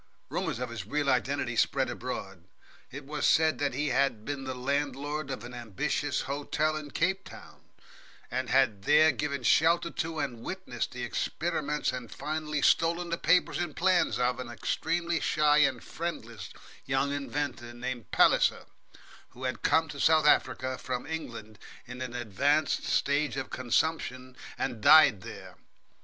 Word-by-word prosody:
Rumours 165 -8 -2
of 125 -1 -4
his 105 -4 -6
real 145 +2 +1
identity - - 0
spread - - +2
abroad. - - -6 0.4
It 140 +1 -9
was 150 +1 -4
said 160 0 +3
that 140 -3 -1
he 150 +2 0
had 125 -4 +1
been 140 -2 -4
the 130 0 -4
landlord 140 +2 -2
of 130 -5 -5
an 120 +1 -9
ambiguous 115 -6 -2
hotel 145 +2 -1
in 155 -1 -6
Cape 190 +6 0
Town, - - -13 0.7
and 130 0 -2
had 120 -7 +2
there 155 +2 +6
given 140 0 -3
shelter 165 +7 +3
to, 165 0 -3
and 120 -6 -3
witnessed, 185 -8 -4
the 125 -1 -5
experiments 150 +4 -2
and 125 -3 -6
finally 150 0 -3
stolen 170 +1 +2
the 170 - 0
papers 180 +2 +2
and 175 -4 -3
plans 185 0 +2
of, 125 0 0
an 125 -2 -6
extremely 165 +7 -1
shy 150 -1 +3
and 135 -5 +2
friendless 120 -10 -6 0.3
young 135 +1 0
inventor 140 -3 -3
named 120 -1 -6
Palliser, - - +3 0.6
who 130 - -12
had 130 -2 -3
come 160 0 +3
to 140 - -8
South 155 +1 +4
Africa 130 -3 +2
from 125 -1 -4
England 115 -9 -7 0.3
in 125 +1 -9
an 125 -2 -5
advanced 135 +7 +1
stage 145 0 +1
of 135 - -4
consumption, 130 -1 -1 0.2
and 110 - -3
died 145 -9 +7
there. - - -10
140 Hz, 155 wpm, -29 LUFS, 125-155 Hz, 0.7 s, died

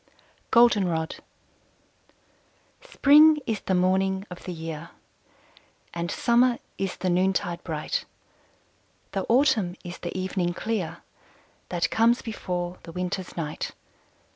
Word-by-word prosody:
GOLDENROD. 190 -9 +3 1.6
Spring 310 - +6
is 220 -3 -1
the 190 - -1
morning 190 +1 +1
of 180 - -9
the 185 - -4
year, 165 -1 -6 1.0
And 170 0 -3
Summer 240 +3 +3 0.2
is 195 -2 -2
the 185 - -1
noontide 180 -1 0
bright; 155 -3 -3 1.1
The 195 -2 -2
Autumn 225 -8 +3
is 175 -1 -8
the 175 +1 -5
evening 185 -2 -1
clear 210 -6 -3 0.7
That 175 -2 0
comes 230 +2 +3
before 180 -5 -4
the 165 - -10
Winter's 180 +1 -4
night. 155 -2 -4
185 Hz, 110 wpm, -26 LUFS, 175-225 Hz, 1.6 s, Spring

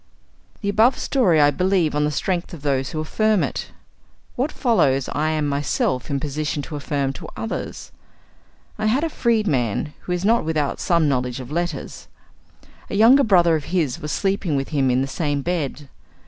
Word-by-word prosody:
The 200 - -1
above 225 +6 +4
story 190 - +2
I 145 0 +5
believe 180 0 +1
on 150 0 +1
the - - +1
strength 175 +4 -2
of 150 - -14
those 135 -2 0
who 155 - -4
affirm 215 +5 +1
it. - - -3 0.7
What 270 +5 -1
follows 140 - +2
I 155 +2 0
am 155 -2 0
myself 140 -2 -1
in 140 - -1
a - - 0
position 150 +1 -3
to 150 - -7
affirm 140 -2 -2
to - - -9
others. 225 - -5 0.9
I 215 - 0
have 255 +8 +2
a 330 - 0
freedman, 155 - 0
who - - -7
is 180 +1 -1
not 230 +3 +3
without 155 -3 -1
some 170 -3 +2
knowledge 125 -2 -1
of 130 +1 -8
letters. 170 -3 -4 0.8
A - - -3
younger 240 +7 +6
brother 175 -7 +4
of 150 -2 -3
his 165 -5 -1
was 150 0 -4
sleeping 195 -5 0
with 135 0 -2
him 140 -4 +1
in 125 +1 +2
the 135 - -1
same 145 -1 -2
bed. 150 -4 -3
155 Hz, 185 wpm, -22 LUFS, 140-195 Hz, 0.9 s, younger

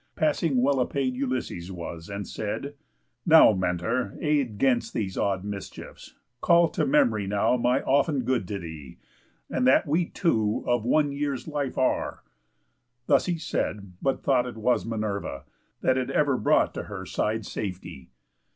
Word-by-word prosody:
Passing 150 -5 +1
well 140 0 +2
apaid 130 -1 -1
Ulysses 125 -9 -3
was, 85 -2 -7
and 100 0 -5
said: 110 +7 -4 0.5
"Now, 160 -8 +7
Mentor, 95 +4 -1
aid 140 -8 0
'Gainst 120 -2 +1
these 95 -4 -2
odd 95 -2 0
mischiefs; 100 -1 -8 0.3
call 170 -1 +5
to - - -1
memory 265 - +2
now 100 +5 +2
My 125 +2 +1
often 140 0 +2
good 120 -6 0
to 100 - -3
thee, 80 -6 -9 0.5
and 125 - 0
that 130 - +5
we 165 +4 +1
two 110 - 0
Of 120 -2 +1
one 145 +3 +2
year's 140 -1 -3
life 145 -3 -3
are." 130 - 0 0.8
Thus - - +3
he 175 -2 0
said, 100 - -3
but 135 - -1
thought 130 -3 +2
ft 125 - -6
was 115 +2 0
Minerva, 105 - -3 0.4
that 130 - +2
had 130 0 -1
ever 140 0 +2
brought 105 - +2
To - - -5
her - - -7
side 110 0 -2
safety. 90 -10 -6
125 Hz, 155 wpm, -26 LUFS, 100-140 Hz, 0.8 s, Now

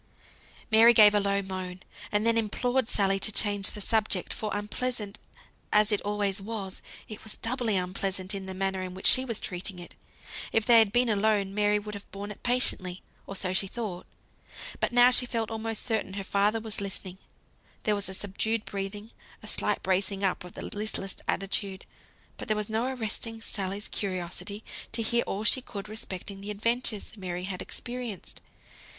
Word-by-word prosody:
Mary 230 +2 +8
gave 210 -1 +9
a 205 - +4
low 200 0 +1
moan, 185 -1 -5 0.3
and 210 +1 +1
then 230 0 +4
implored 245 +3 +1
Sally 195 -1 +2
to 215 - +2
change 205 -1 +3
the 210 - -6
subject; 210 -3 +1
for 215 - -3
unpleasant 210 +1 -2 0.5
as 210 +1 +4
it 210 - +2
always 205 -1 0
was, 195 -2 -5 0.3
it 215 - -9
was 220 - -7
doubly 230 -2 -1
unpleasant 190 +1 -1
in 195 -1 -4
the 190 - -5
manner 190 0 -1
in 185 -1 -5
which 190 - -8
she 255 - +8
was 230 -4 -1
treating 180 +1 -3
it. 175 -1 -10 0.6
If 225 -1 +2
they 235 -2 +8
had 220 -3 +5
been 245 +2 +4
alone, 205 -2 +2
Mary 210 0 +3
would 210 0 -6
have 205 -1 -9
borne 200 +2 -6
it 210 - -11
patiently, 190 -7 +2 0.2
or 195 - -6
so 185 -1 0
she 195 +1 +3
thought, 200 -5 -5 0.7
but - - +1
now 245 +1 +7
she 250 0 +6
felt 230 -2 -2
almost 225 0 -3
certain 220 -5 -1
her 195 0 -4
father 200 +3 +2
was 220 -2 -4
listening; 190 -1 -4 0.6
there 215 - +3
was 200 -2 -1
a 190 - -3
subdued 210 +3 -1
breathing, 205 +2 -5 0.3
a - - -8
slight - - +1
bracing 195 +1 0
up 190 -2 +1
of 180 - -11
the - - -6
listless 205 -2 0
attitude. 195 0 -1 0.5
But - - -7
there 215 - +1
was 210 0 -2
no 225 +2 +1
arresting 225 -2 -4
Sally's 200 -2 -3
curiosity 190 +2 -4 0.3
to 230 0 +2
hear 235 +2 +3
all 200 +2 -2
she 260 +4 +4
could 210 -5 -7
respecting 195 -2 -6
the 200 - -6
adventures 220 0 -1
Mary 180 -2 -4
had 185 -1 -4
experienced. 240 -5 -5
205 Hz, 180 wpm, -28 LUFS, 195-225 Hz, 0.7 s, gave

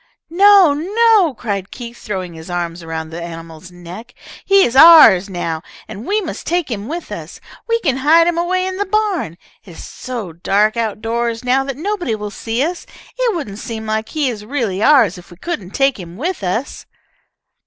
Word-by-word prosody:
"No! 390 -3 +6
No!" 395 - +2
cried 200 -4 -4
Keith, 240 -1 -9
throwing 185 -4 -5
his 160 +1 -11
arms 175 -1 -4
around 160 -1 -6
the 170 +1 -6
animal's 165 0 -9
neck. 180 +7 -11 0.3
"He 395 0 +4
is 240 - 0
ours 270 - +8
now, 165 -3 -3 0.3
and 210 +5 -9
we 425 +2 +1
must 350 - -7
take 345 -4 -1
him 210 -1 -4
with 340 +4 -6
us. - - -8 0.3
We 460 0 +2
can 270 -6 0
hide 315 +5 +4
him 345 0 +1
away 370 +2 0
in 375 0 -4
the 405 - -2
barn. 390 - -1 0.3
It - - -16
is - - -10
so 230 -9 -7
dark 205 +6 +1
out 220 -2 -2
doors 235 +1 -2
now 260 +2 +2
that 275 -1 -5
nobody 350 - -2
will 210 -1 -6
see 230 +4 -2
us. 345 +3 -4 0.3
It - - 0
wouldn't 210 - -6
seem 220 -2 -6
like 220 0 -2
he 300 -3 -1
is 220 -4 -4
really 220 -6 -2
ours 225 - +4
if 175 - -16
we 175 - -14
couldn't 210 - -5
take 270 -4 +1
him 175 0 -10
with 345 - -3
us." 190 +9 -3
235 Hz, 195 wpm, -17 LUFS, -, 0.3 s, ours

